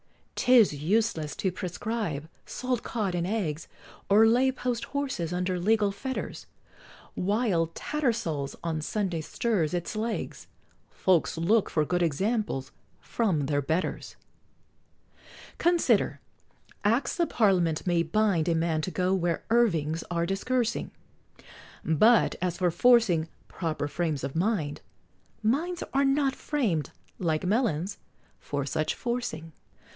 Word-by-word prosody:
'Tis 245 -8 +5
useless 160 0 0
to 190 - -1
prescribe 180 -4 -3 0.2
salt 250 -2 -2
cod 210 -6 -2
and 175 0 -1
eggs, 175 -7 -2 0.4
Or 210 +3 +7
lay 250 +4 +4
post 250 -2 -3
horses 265 - -3
under 180 0 -1
legal 210 +2 +2
fetters, 260 +6 -5 0.7
While 200 -4 +1
Tattersall's 220 - -1
on 160 -2 -2
Sunday 180 -1 -2
stirs 180 -2 -1
its 175 +4 -3
Legs, 220 +1 -3 0.4
Folks 180 -3 +1
look 200 +6 +2
for 155 -2 +1
good 180 +3 0
examples 170 - -1 0.3
from 195 -10 0
their 145 +1 0
Betters! 160 +6 -2 1.4
Consider, 345 0 +2 0.6
Acts 240 - +1
of 340 - +2
Parliament 180 -8 +2
may 175 -2 +2
bind 175 -1 +1
A 165 - +2
man 160 -1 0
to 170 - -3
go 185 0 0
where 175 -3 0
Irvings 165 -9 +2
are 170 -1 0
discoursing 235 +6 -1 1.0
But 215 +9 +4
as 180 -1 -1
for 180 -2 +2
forcing 220 -7 +4 0.2
"proper 155 -4 -3
frames 155 -3 -2
of 135 +1 -4
mind," 170 -5 0 0.6
Minds 330 +10 0
are 275 +1 +3
not 270 0 +2
framed, 200 - -1 0.3
like 160 -1 0
melons, 200 - 0 0.4
for 140 -1 -3
such 155 +2 -1
forcing! 235 -10 -3
185 Hz, 120 wpm, -28 LUFS, 160-230 Hz, 1.4 s, Or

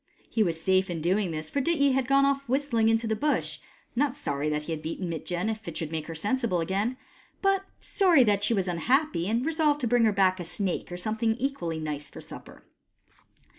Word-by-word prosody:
He 225 - +1
was 170 -5 +1
safe 190 +3 +2
in 170 -2 -3
doing 185 +4 +1
this, 155 -1 -4
for 280 - 0
Dityi 285 -2 +3
had 260 -1 0
gone 275 +1 +4
off 275 -1 0
whistling 255 -4 +2
into 225 +1 +2
the 220 0 0
Bush 295 +6 -1 0.2
— - - -35
not 280 +1 +1
sorry 145 - -2
that 150 0 -1
he 165 - -6
had 160 -1 -3
beaten 165 +4 -4
Mitjen, 175 +4 -2
if 220 -2 -4
it 170 - -4
should 160 -2 -3
make 155 -1 -4
her 165 - -6
sensible 205 +2 0
again, 200 +9 -1 0.5
but 390 0 +2 0.2
sorry 355 -9 +4
that 205 -3 +2
she 225 +2 +2
was 190 -2 0
unhappy, 205 - +1
and 230 +4 0
resolved 310 -2 +2
to 245 - 0
bring 240 0 +4
her 220 - +4
back 190 -2 +2
a - - -3
snake 180 +1 -3
or 175 - -4
something 220 +4 0
equally 245 -11 -2
nice 150 -2 -5
for - - -11
supper. - - -10
215 Hz, 220 wpm, -27 LUFS, 170-265 Hz, 0.5 s, gone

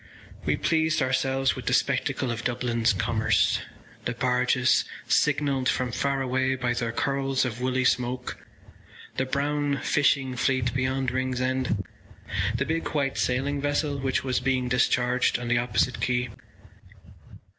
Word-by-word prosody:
We - - +1
pleased 160 -1 +1
ourselves 135 +1 +1
with - - -8
the - - +3
spectacle 130 - 0
of 120 0 -4
Dublin’s 120 -2 +1
commerce—the 110 +3 -1
barges 125 +1 +2 0.2
signalled 135 -3 +2
from 125 -1 0
far 135 +2 0
away 130 +1 0
by 125 -2 -1
their 120 -1 -2
curls 135 +2 0
of 120 -1 -4
woolly 130 0 0
smoke, 125 0 0 0.8
the 130 - 0
brown 145 +1 0
fishing 135 -3 +2
fleet 125 -1 +1
beyond 130 0 0
Ringsend, 130 -3 -1 0.7
the 140 - 0
big 165 +2 -1
white 140 -2 0
sailing 140 +3 0
vessel 145 0 0
which 135 -1 0
was 130 -2 0
being 130 0 0
discharged 125 0 +2
on 120 0 -5
the 120 0 +3
opposite 125 +1 0
quay. 125 -1 0
130 Hz, 135 wpm, -26 LUFS, 125-135 Hz, 0.8 s, the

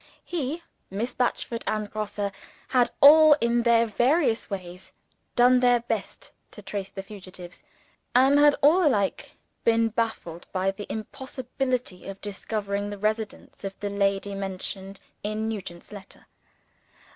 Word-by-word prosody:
He, 325 0 -3 0.3
Miss 215 +6 -3
Batchford, 240 -1 -1
and 215 -1 -1
Grosse, 205 -1 -3 0.4
had 250 -2 +3
all, 310 +2 +9
in 235 -4 +1
their 235 -1 +4
various 240 +2 +1
ways, 185 -2 -7 0.4
done 250 +1 +6
their 245 -1 +4
best 225 -4 -4 0.2
to 210 - -12
trace 195 0 -5
the 195 - -7
fugitives 185 -3 -11 0.5
and 270 +3 +6
had 290 0 +6
all 335 +6 +6
alike 210 - 0 0.3
been 230 0 +3
baffled 220 -7 -3
by 190 +1 0
the 200 +1 -8
impossibility 255 -2 -4
of 195 0 -7
discovering 205 0 -3
the 205 - -6
residence 215 +1 -3
of 195 -1 -6
the 205 -1 -3
lady 200 0 0
mentioned 195 0 -5 0.2
in 215 +1 -2
Nugent's 185 -6 -6
letter. 200 -2 -12
215 Hz, 135 wpm, -26 LUFS, 195-245 Hz, 0.5 s, all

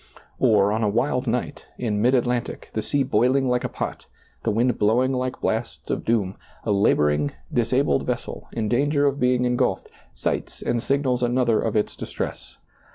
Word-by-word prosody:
Or, 105 -2 +4
on 110 +1 0
a 105 - +2
wild 125 +4 0
night, 125 +5 -2
in 105 -4 -1
mid 125 +4 +4
Atlantic, 125 -1 -1
the 110 - -1
sea 140 +5 0
boiling 130 +1 +2
like 125 -1 +1
a - - -2
pot, - - -5 0.3
the - - -1
wind 115 +3 +1
blowing 120 +5 +3
like 130 0 -2
blasts 115 +2 -2
of - - -2
doom, 100 -5 0 0.3
a 110 - -1
laboring, 75 -7 +2 0.2
disabled - - +1
vessel, - - -4
in 110 -2 -2
danger 145 +5 +2
of 140 0 +1
being 125 0 +2
en 125 0 +1
gulfed, - - 0 0.3
sights - - -3
and 120 -1 0
signals 135 -2 0
another 120 -2 +2
of 110 -2 -2
its 105 - 0
distress. - - -6
120 Hz, 175 wpm, -24 LUFS, 110-130 Hz, 0.3 s, Or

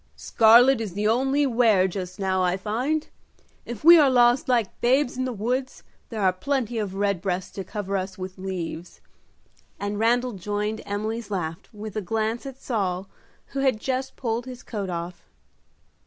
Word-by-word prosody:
"Scarlet 235 +3 +5
is 210 -6 -4
the 210 +1 0
only 270 +5 +2
wear 225 -7 +3
just 185 0 -6
now, 190 -1 0
I 180 0 +1
find. 250 +11 -1 0.6
If 240 0 -7
we 335 +1 +9
are 290 -3 +5
lost 245 0 +4
like 235 -5 0
babes 255 +2 +2
in 255 +1 -1
the 255 - -2
woods 250 +4 -3 0.3
there 220 -3 -4
are 185 -1 +4
plenty 240 +2 -2
of 200 -3 -3
redbreasts 195 -2 -1
to 195 - -6
cover 200 +1 -4
us 190 0 -3
with 185 0 -7
leaves," 180 -2 -5 0.8
and 205 0 -3
Randal 240 +2 +2
joined 210 +3 -3
Emily's 215 +2 -3
laugh, 175 -3 -4
with 215 -1 -8
a 215 - -1
glance 225 +5 -2
at 265 -1 -9
Saul, 195 -7 -2 0.4
who 275 - -4
had 265 -5 +2
just 260 +2 -3
pulled 235 0 -3
his 250 -1 -9
coat 205 -4 -4
off. 175 0 -5
215 Hz, 170 wpm, -25 LUFS, 190-245 Hz, 0.8 s, we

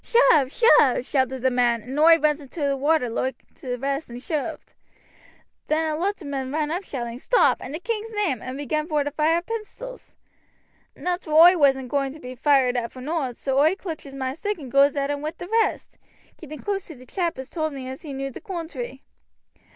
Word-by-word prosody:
'Shove, 310 - +4
shove!' 290 - +5
shouted 260 -2 0
the 260 - +3
men, 240 -2 +2
and 265 +4 -4
oi 325 +1 +7
runs 305 -1 +1
into 280 +4 -10
t' - - +2
water 285 0 +2
loike 255 +3 -3
t' 250 -2 -5
rest 275 +4 -3
and 240 +1 -7
shooved. 295 +2 -4 0.9
Then 315 0 +1
a - - -1
lot 385 +3 -2
o' - - -9
men 270 -2 -3
run 305 0 -1
up 355 +4 -2
shouting, 240 -6 -5
'Stop! 485 - +3
in 255 - -7
the 310 - -4
king's 450 +2 -3
name!' 395 - -1
and 255 +1 -6
began 305 +2 -2
vor 300 -3 +1
to 290 - -3
fire 315 +3 +1
pistols. 455 +4 -7 0.8
"Nateral 350 -3 -1
oi 350 +3 +9
wasn't 270 -5 +3
a - - -11
going 275 0 0
to 310 - -12
be 250 -2 -8
fired 260 -1 +3
at 235 -1 -2
for 255 - -11
nowt, 270 -3 -3
so 270 0 0
oi 315 +6 +4
clutches 315 -8 -7
moi 260 -1 -2
stick 410 +7 -3
and 270 -6 -9
goes 275 +1 +5
at 280 0 0
'em 285 0 -3
wi' 310 +2 -3
the 355 - -7
rest, 450 +2 0 0.4
keeping 305 -1 -9
close 395 +1 -3
to 320 - -9
t' 255 0 -14
chap 340 +2 -2
as 265 0 -8
told 315 -2 -2
me 265 -2 -7
as 260 +1 -7
he 305 - -8
knew 275 0 -4
the - - -10
coontry. 320 - -6
290 Hz, 215 wpm, -24 LUFS, 265-330 Hz, 0.9 s, oi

